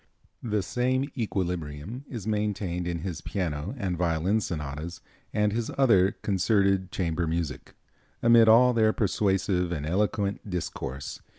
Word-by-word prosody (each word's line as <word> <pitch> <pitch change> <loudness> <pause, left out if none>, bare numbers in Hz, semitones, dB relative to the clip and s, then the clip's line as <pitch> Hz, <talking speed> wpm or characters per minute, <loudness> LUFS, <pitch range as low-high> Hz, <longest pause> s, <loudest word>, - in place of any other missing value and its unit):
The 105 -4 -1
same 130 +5 0
equilibrium 90 - -3
is 115 -7 -6
maintained 100 -5 -1
in 85 -2 -2
his 85 -3 -4
piano 85 - -3
and 95 -6 -2
violin 90 +5 +1
sonatas 75 -1 -5 0.3
and 105 -1 +1
his 115 0 -2
other 100 -8 +4
concerted 95 -1 +2
chamber 85 -2 -1
music, 80 -2 -3 0.5
amid 115 -1 +7
all 125 +3 +7
their 110 -2 +3
persuasive 95 -3 +1
and 75 -4 -3
eloquent 100 +3 -1
discourse. 70 -6 -4
95 Hz, 125 wpm, -27 LUFS, 85-110 Hz, 0.5 s, amid